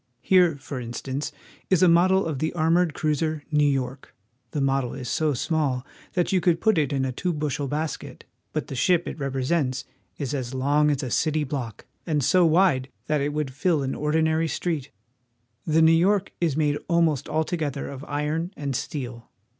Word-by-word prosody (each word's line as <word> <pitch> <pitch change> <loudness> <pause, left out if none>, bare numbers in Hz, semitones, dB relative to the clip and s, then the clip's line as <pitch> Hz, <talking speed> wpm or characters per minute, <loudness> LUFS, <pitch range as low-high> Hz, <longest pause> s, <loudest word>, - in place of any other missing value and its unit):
Here, 180 -5 +4
for 135 -1 -6
instance, 130 +4 -4 0.4
is 185 -1 +4
a - - +7
model 185 +3 +4
of 155 -5 -3
the 160 +2 0
armored 165 0 +2
cruiser 155 0 -1
Nezv 145 -1 +4
York. 135 0 -4 0.3
The 150 - -3
model 135 -2 0
is 130 -2 -6
so 155 -3 +1
small 140 -3 0 0.3
that 175 -2 +1
you 185 -2 +2
could 170 -2 +2
put 220 -6 +3
it 150 -1 0
in 135 -2 0
a 130 - -1
two 180 +8 -2
bushel 150 -2 -2
basket; 150 +3 -4 0.3
but - - -2
the - - -8
ship 175 +7 +2
it - - -6
represents 135 0 -1 0.3
is 140 -1 -3
as 130 -2 -3
long 145 +3 +3
as 145 -1 0
a 125 - -4
city 155 +2 +1
block, 130 -5 -5 0.2
and 150 -4 +1
so 180 +7 +4
wide 160 -6 +3 0.2
that 150 -2 0
it 145 +1 0
would 150 -3 -2
fill 160 0 +1
an 135 - -2
ordinary 160 +2 +1
street. 155 -3 -2 0.8
The 160 +1 +4
Neiv 165 0 +6
York 195 +2 +2
is 160 -5 +1
made 150 -2 +1
almost 165 -5 +2
altogether 155 -3 -1
of 140 0 -7
iron 150 +4 -2
and 140 -2 -3
steel. 120 -4 -5
150 Hz, 185 wpm, -25 LUFS, 135-165 Hz, 0.8 s, a